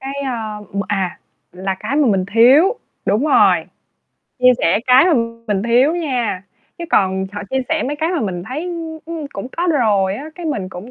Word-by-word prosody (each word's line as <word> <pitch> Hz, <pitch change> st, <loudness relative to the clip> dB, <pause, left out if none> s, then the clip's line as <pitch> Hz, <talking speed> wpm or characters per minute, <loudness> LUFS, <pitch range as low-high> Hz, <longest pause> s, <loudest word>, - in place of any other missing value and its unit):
Cái, 270 Hz, +1 st, -6 dB
a, 225 Hz, -5 st, -4 dB, 0.2 s
m 200 Hz, -, -1 dB
à, 190 Hz, -3 st, -2 dB, 0.3 s
là 190 Hz, +2 st, -3 dB
cái 280 Hz, -, -2 dB
mà 295 Hz, -3 st, +3 dB
mình 190 Hz, -3 st, +1 dB
thiếu, 280 Hz, -, +5 dB, 0.3 s
đúng 215 Hz, +8 st, +1 dB
rồi, -, -, +5 dB, 0.8 s
chia 250 Hz, -, +5 dB
sẻ 175 Hz, +5 st, +2 dB
cái 255 Hz, +4 st, +6 dB
mà 360 Hz, -, +3 dB, 0.3 s
mình 205 Hz, -2 st, 0 dB
thiếu 250 Hz, +7 st, +3 dB
nha, 245 Hz, -, -2 dB, 0.4 s
chứ 340 Hz, -, -5 dB
còn 190 Hz, 0 st, +2 dB
họ 205 Hz, -, -5 dB
chia 265 Hz, 0 st, 0 dB
sẻ 320 Hz, -1 st, 0 dB
mấy 295 Hz, +2 st, -3 dB
cái 320 Hz, +2 st, -1 dB
mà 345 Hz, -, -1 dB
mình 180 Hz, -4 st, -3 dB
thấy, 295 Hz, +7 st, -4 dB
ưm, 330 Hz, -2 st, -5 dB
ưm, 325 Hz, -3 st, -5 dB
cũng 195 Hz, -, -6 dB
có 345 Hz, +1 st, 0 dB
rồi 200 Hz, -8 st, +2 dB
á, 275 Hz, -, -7 dB
cái 345 Hz, -1 st, -7 dB
mình 205 Hz, -11 st, -2 dB
cũng 190 Hz, +7 st, -9 dB
250 Hz, 205 wpm, -18 LUFS, 200-305 Hz, 0.8 s, cái